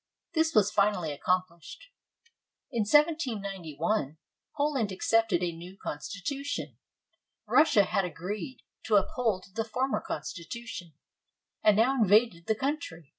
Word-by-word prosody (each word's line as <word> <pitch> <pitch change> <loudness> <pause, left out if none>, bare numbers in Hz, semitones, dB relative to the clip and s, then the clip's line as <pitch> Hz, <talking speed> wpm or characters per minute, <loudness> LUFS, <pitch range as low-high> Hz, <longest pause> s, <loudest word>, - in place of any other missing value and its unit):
This 320 -2 +1
was 205 -1 +5
finally 200 -6 +1
accomplished. 180 - -3 0.8
In 230 -5 0
1791, 200 - +1 0.4
Poland 280 -8 0
accepted 200 -1 +2
a 175 - 0
new 180 +3 -10
constitution. 200 - -5 0.7
Russia 295 -9 +5
had 195 0 0
agreed 200 - -5 0.2
to 220 - +2
uphold 205 -1 +1
the 225 - -1
former 255 +4 -1
constitution, 170 - -6 0.7
and 210 -1 +5
now 250 +3 +3
invaded 205 -4 +3
the 220 - +2
country. 215 - -4
210 Hz, 110 wpm, -29 LUFS, 180-250 Hz, 0.8 s, was